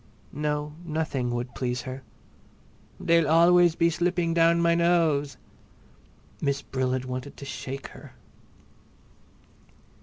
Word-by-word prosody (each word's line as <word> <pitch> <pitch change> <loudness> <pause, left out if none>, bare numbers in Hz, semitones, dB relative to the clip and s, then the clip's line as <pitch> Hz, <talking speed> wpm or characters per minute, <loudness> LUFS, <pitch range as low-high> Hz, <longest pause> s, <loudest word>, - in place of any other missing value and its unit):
No, 150 0 -2
nothing 155 -6 -2
would 120 +1 -4
please 125 -1 -3
her. 130 +1 -7 1.0
"They'll 165 -2 +3
always 170 +1 +5
be 170 0 +2
sliding 175 0 0
down 170 0 +4
my 170 0 +3
nose!" 165 -4 +2 1.0
Miss 140 -1 -1
Brill 130 -1 -2
had 130 0 -2
wanted 130 +2 -6
to 140 - -9
shake 135 0 -6
her. - - -14
150 Hz, 115 wpm, -26 LUFS, 130-170 Hz, 1.0 s, always